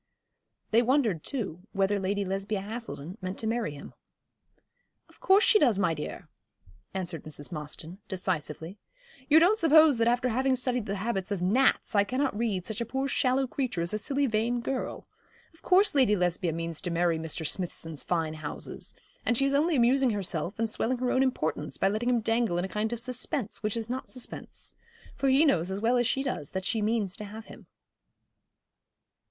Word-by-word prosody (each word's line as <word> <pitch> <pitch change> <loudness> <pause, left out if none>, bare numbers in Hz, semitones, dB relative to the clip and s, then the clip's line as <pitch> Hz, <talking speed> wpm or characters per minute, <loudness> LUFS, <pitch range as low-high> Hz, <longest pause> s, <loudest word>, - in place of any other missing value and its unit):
They 225 +2 +5
wondered, 240 - +1
too, 190 - -4
whether 195 0 +1
Lady 200 +1 -1
Lesbia 195 +2 -2
Haselden 205 -5 -6
meant 185 +1 -4
to - - -3
marry 225 -9 -1
him. 140 - -10 1.1
'Of - - -22
course 390 +3 +5
she 425 - +6
does, 240 - +4
my 185 -5 +2
dear,' 150 -1 -6 0.6
answered 180 -3 -4
Mrs. 145 0 -7
Mostyn, 155 +3 -7
decisively. 180 -1 -3 0.5
'You 305 - +7
don't 390 +7 +4
suppose 315 -3 +6
that 230 0 +2
after 245 +1 +2
having 260 +3 +2
studied 250 -3 -1
the 200 - -2
habits 195 -1 -2
of 200 -3 -1
gnats 240 +9 +2
I 200 -1 +5
cannot 255 +3 -1
read 205 -5 -1
such 220 +1 -4
a - - 0
poor 265 +3 -1
shallow 265 0 +2
creature 250 -9 -2
as 170 - -2
a 215 - 0
silly 280 +6 0
vain 235 +1 0
girl. 260 +2 -4 0.5
Of 325 - -23
course 380 +3 +4
Lady 255 -7 +4
Lesbia 180 -2 0
means 165 0 -4
to 180 - -3
marry 170 -1 +1
Mr. 160 0 -3
Smithson's 165 -3 -3
fine 165 -3 -1
houses; 155 -2 -6 0.3
and 240 - +1
she 275 - +3
is 275 - +1
only 310 +4 +3
amusing 255 +1 +4
herself 195 -3 -2
and 225 +1 +1
swelling 235 +3 -1
her 250 0 0
own 260 - +3
importance 160 - -1
by 195 - +2
letting 215 +4 -1
him 240 -2 +2
dangle 225 -4 +1
in 175 - 0
a - - -3
kind 210 +3 -2
of 235 - -3
suspense 250 -1 -2
which 210 +1 -1
is 225 -1 -3
not 255 +2 -4
suspense; 255 -2 -6 0.4
for 275 - +1
he 270 +4 +5
knows 180 - +2
as 190 +1 -3
well 230 +3 +2
as 245 -1 +2
she 270 +1 0
does 245 - -3
that 190 0 -4
she 220 +2 0
means 210 -3 0
to - - -7
have 215 +2 -9
him.' - - -13
215 Hz, 190 wpm, -28 LUFS, 185-255 Hz, 1.1 s, You